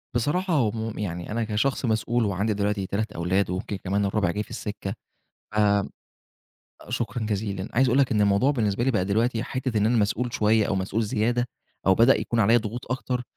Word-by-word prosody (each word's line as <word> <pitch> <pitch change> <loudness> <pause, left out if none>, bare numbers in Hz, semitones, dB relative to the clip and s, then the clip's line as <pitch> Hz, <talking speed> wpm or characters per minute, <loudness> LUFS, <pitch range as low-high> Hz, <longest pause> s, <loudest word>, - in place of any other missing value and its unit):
بصراحة 170 - 0
هم 115 -4 0
يعني 90 -1 -4
أنا 115 +1 0
كشخص 110 +5 0
مسؤول 115 +1 +1
وعندي 100 +2 0
دلوقتي 100 -1 -1
3 110 +2 -2
أولاد 90 +4 0
ويمكن 95 +3 -3
كمان 100 +2 -1
الرابع 100 -3 +1
جاي 105 +3 -2
في - - -20
السِكّة، 105 -1 -5 0.6
ف - - -4 1.3
شكرًا 120 - -2
جزيلًا. 100 -2 -2
عايز 130 +2 +4
أقول 125 +3 +3
لك 135 -4 +3
إن 105 - +2
الموضوع 100 +6 +3
بالنسبة 115 -4 0
لي 135 - +2
بقى 95 -6 +1
دلوقتي 115 +4 +1
حتّة 130 -4 -2
إن 105 - +3
أنا 120 +1 +2
مسؤول 110 +3 0
شوية 105 0 +3
أو 95 - +1
مسؤول 95 +4 -1
زيادة 120 +4 0 0.4
أو 95 - +6
بدأ 115 +6 +5
يكون 115 -1 -1
عليّا 115 +4 +5
ضغوط 120 +3 -5
أكتر، 125 -1 -2
110 Hz, 190 wpm, -25 LUFS, 100-120 Hz, 1.3 s, أو